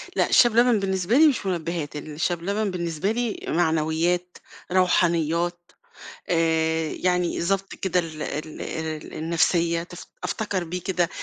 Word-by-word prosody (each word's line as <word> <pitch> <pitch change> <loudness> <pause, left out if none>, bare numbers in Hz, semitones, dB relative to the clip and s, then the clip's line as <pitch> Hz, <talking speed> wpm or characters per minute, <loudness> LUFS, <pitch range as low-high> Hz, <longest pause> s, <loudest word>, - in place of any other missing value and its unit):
لأ - - +2
الشاي 240 - +6
بلبن 235 0 +4
بالنسبة 190 +3 +1
لي 315 +1 +8
مش 265 -8 0
منبهات، 170 -4 -3
الشاي 155 +4 -2
بلبن 200 +4 -1
بالنسبة 170 +1 -2
لي 235 -1 -2
معنويات، 165 +2 0 0.3
روحانيات، 175 -1 +1 0.6
آآ، 160 -1 +1
يعني 180 -1 0
ضبط 195 +3 -1
كده 185 -1 0
ال 160 -3 -7
ال 155 +1 -5
ال 160 -1 -5
النفسية، 170 +1 +1
تف 175 +1 -11 0.2
أفتكر 205 -5 -2
بيه 180 +2 -4
كده 175 -2 0
175 Hz, 135 wpm, -24 LUFS, 160-190 Hz, 0.6 s, لي